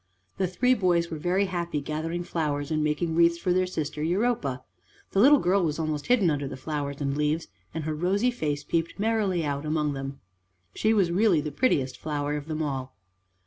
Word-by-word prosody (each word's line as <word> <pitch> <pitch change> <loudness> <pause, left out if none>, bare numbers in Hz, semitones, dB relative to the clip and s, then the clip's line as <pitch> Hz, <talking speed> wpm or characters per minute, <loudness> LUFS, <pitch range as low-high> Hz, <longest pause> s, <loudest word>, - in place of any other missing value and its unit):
The 190 - +1
three 250 +8 +2
boys 175 -6 +1
were 160 - -4
very 180 +5 +1
happy 170 -4 -2
gathering 160 +4 -3
flowers 145 -4 -2
and 155 -1 +1
making 155 +2 0
wreaths 170 +1 +4
for 175 +1 0
their 185 0 +2
sister 155 -4 -4
Europa. 165 - 0 0.5
The 195 - +1
little 280 +7 +8
girl 190 -4 +2
was 155 -3 0
almost 155 -2 -2
hidden 220 -9 +4
under 145 -2 -2
the 135 - -6
flowers 145 0 -4
and 140 -1 -1
leaves, 150 +2 0 0.2
and 160 - -4
her 155 +1 -2
rosy 195 +10 +1
face 150 -11 -2
peeped 165 +2 -1
merrily 205 -5 +1
out 140 0 -2
among 150 -1 0
them. 135 0 -6 0.5
She 215 - +1
was 195 -6 +3
really 190 -2 +4
the 150 0 -3
prettiest 140 - +1
flower 145 -1 -2
of 150 0 -5
them 155 0 -2
all. 135 -3 -4
160 Hz, 195 wpm, -27 LUFS, 150-185 Hz, 0.5 s, little